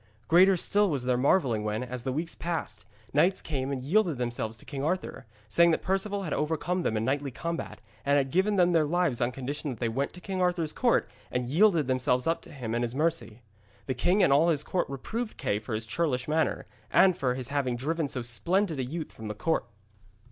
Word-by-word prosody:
Greater 185 +3 +6
still 205 +3 +2
was 140 -6 -1
their 125 -1 +2
marvelling 125 - +2
when, 105 +3 -2
as 125 0 -5
the 130 - -2
weeks 160 +5 -2
passed, 130 - -4 0.3
knights 170 +7 +3
came 135 -3 -3
and 130 -2 -3
yielded 175 0 +2
themselves 120 -2 -3
to - - -13
King 140 -2 -5
Arthur, 160 -6 -2 0.2
saying 170 +9 +5
that 165 - +1
Perceval 195 +2 -1
had 165 - -3
overcome 165 +4 -1
them 110 -10 0
in 110 - -1
knightly 140 +2 0
combat, 170 +6 -5 0.2
and 140 +2 +3
had 135 -2 0
given 195 +5 +2
them 180 -2 +4
their 160 -3 +3
lives 165 -6 +1
on 120 +1 +1
condition 140 +4 -4
that 125 - -6
they 120 - 0
went 135 +5 -1
to 180 - -10
King 185 0 -3
Arthur's 175 -4 0
court 245 -2 +2 0.2
and 125 0 -1
yielded 170 0 +4
themselves 125 -1 +1
up 165 +1 0
to - - -14
him 125 -6 -5
and 120 +1 0
his 120 +1 -3
mercy. 125 -8 -1 0.4
The 130 - -1
king 180 +10 +2
and 140 - +5
all 155 +4 +5
his 150 -3 +1
court 180 - -1
reproved 215 - -4
Kay 105 - -1
for 110 +1 -4
his 110 +1 -4
churlish 125 0 -1
manner, 155 +1 0 0.2
and 190 -2 +5
for 130 -7 0
his 130 -2 -5
having 140 -4 0
driven 155 +5 -1
so 130 -3 -4
splendid 170 - 0
a - - 0
youth 155 +5 -5
from 110 - -9
the 105 - -4
court. 160 +9 0
145 Hz, 220 wpm, -28 LUFS, 125-175 Hz, 0.4 s, Greater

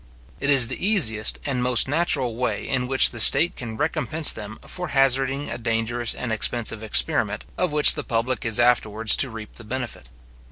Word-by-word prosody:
It 140 - -2
is 135 -4 +5
the - - -5
easiest 125 - +2
and 130 -3 -3
most 125 -2 +2
natural 145 -5 -1
way 115 -3 -4
in 125 -2 -2
which 135 +1 +3
the 120 - -7
state 140 +10 +5
can 115 -3 -8
recompense 155 +1 0
them 105 +1 -9
for 180 -1 -6
hazarding 135 0 -1
a - - -6
dangerous 115 +1 -2
and 125 - -6
expensive 110 0 -1
experiment, 110 -1 0
of 180 -3 -2
which 150 0 +7
the 145 - -6
public 120 0 -3
is 115 0 0
afterwards 115 -2 +2
to 135 - 0
reap 110 -2 -11
the 120 - -11
benefit. 120 - -7
125 Hz, 185 wpm, -21 LUFS, 115-140 Hz, -, which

